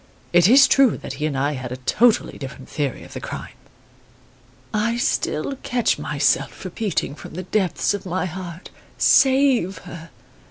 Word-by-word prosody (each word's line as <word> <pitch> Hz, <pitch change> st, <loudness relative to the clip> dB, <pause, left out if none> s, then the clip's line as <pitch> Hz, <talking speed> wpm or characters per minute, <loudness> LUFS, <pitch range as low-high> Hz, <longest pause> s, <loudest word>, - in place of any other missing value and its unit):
It 175 Hz, 0 st, +6 dB
is 265 Hz, +5 st, +7 dB
true 270 Hz, -5 st, +4 dB
that -, -, -7 dB
he 155 Hz, -, +1 dB
and 140 Hz, -3 st, -3 dB
I 140 Hz, +2 st, +1 dB
had 130 Hz, -4 st, -6 dB
a 125 Hz, -, -4 dB
totally 220 Hz, -, +2 dB
different 135 Hz, -1 st, -8 dB
theory 145 Hz, -4 st, -3 dB
of -, -, -13 dB
the -, -, -6 dB
crime. -, -, -7 dB, 1.2 s
"I 220 Hz, +2 st, 0 dB
still 240 Hz, -, -1 dB
catch 245 Hz, -2 st, 0 dB
myself -, -, 0 dB
repeating 205 Hz, -10 st, -2 dB
from 155 Hz, -, -11 dB
the 185 Hz, -, -4 dB
depths 190 Hz, 0 st, 0 dB
of 205 Hz, -, -4 dB
my 185 Hz, 0 st, -2 dB
heart: 180 Hz, 0 st, -8 dB, 0.3 s
'Save 265 Hz, -8 st, +4 dB
her! 170 Hz, -2 st, -10 dB
185 Hz, 160 wpm, -22 LUFS, 150-230 Hz, 1.2 s, is